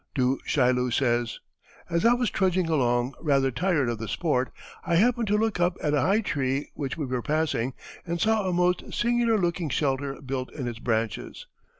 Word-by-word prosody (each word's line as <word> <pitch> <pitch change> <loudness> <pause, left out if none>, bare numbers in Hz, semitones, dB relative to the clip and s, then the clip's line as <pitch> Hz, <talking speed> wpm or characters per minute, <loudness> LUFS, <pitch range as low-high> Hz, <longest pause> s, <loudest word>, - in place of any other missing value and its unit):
Du 130 0 +1
Chaillu 125 -2 +2
says: 120 -2 +1 0.5
"As 170 +2 0
I 235 - +6
was 245 -4 0
trudging 185 -2 +1
along, 125 -4 +1
rather 135 -4 +2
tired 160 0 +1
of 120 -2 -2
the 115 - -5
sport, 130 - 0 0.3
I 170 - 0
happened 235 +4 +3
to 210 +1 +2
look 220 -3 0
up 175 +1 +1
at 150 - +1
a 145 - +3
high 200 +8 +3
tree 135 -6 -2
which 140 0 -4
we 155 - -2
were 130 -1 -2
passing, 140 -4 0 0.3
and 170 0 -3
saw 215 -1 +2
a - - 0
most 180 0 0
singular 235 -1 +2
looking 170 -3 -1
shelter 135 +1 -1
built 130 -2 -4
in 130 -5 -4
its 115 -2 -5
branches. 115 -2 -2
145 Hz, 190 wpm, -26 LUFS, 130-180 Hz, 0.5 s, I